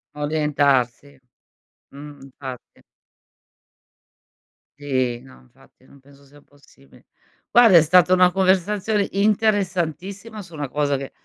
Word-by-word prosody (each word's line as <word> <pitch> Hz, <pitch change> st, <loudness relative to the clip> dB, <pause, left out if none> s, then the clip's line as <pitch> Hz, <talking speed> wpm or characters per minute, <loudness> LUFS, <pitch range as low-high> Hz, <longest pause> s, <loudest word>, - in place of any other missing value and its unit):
Orientarsi. 145 Hz, -3 st, -1 dB, 0.7 s
Mh, 145 Hz, 0 st, -12 dB
infatti. 130 Hz, -2 st, -11 dB, 2.0 s
Sì, 130 Hz, -4 st, -2 dB
no, 130 Hz, -, -17 dB
infatti 65 Hz, -, -25 dB
non 140 Hz, -, -20 dB
penso 140 Hz, +1 st, -22 dB
sia 145 Hz, +1 st, -20 dB
possibile. 140 Hz, -1 st, -24 dB, 0.4 s
Guarda 230 Hz, -7 st, +6 dB
è -, -, +7 dB
stata 180 Hz, +3 st, +3 dB
una 180 Hz, -1 st, +4 dB
conversazione 195 Hz, +2 st, 0 dB
interessantissima 200 Hz, 0 st, -2 dB
su 175 Hz, -3 st, -15 dB
una 145 Hz, -4 st, -6 dB
cosa 145 Hz, -1 st, -1 dB
che 135 Hz, 0 st, -8 dB
150 Hz, 105 wpm, -21 LUFS, 140-190 Hz, 2.0 s, è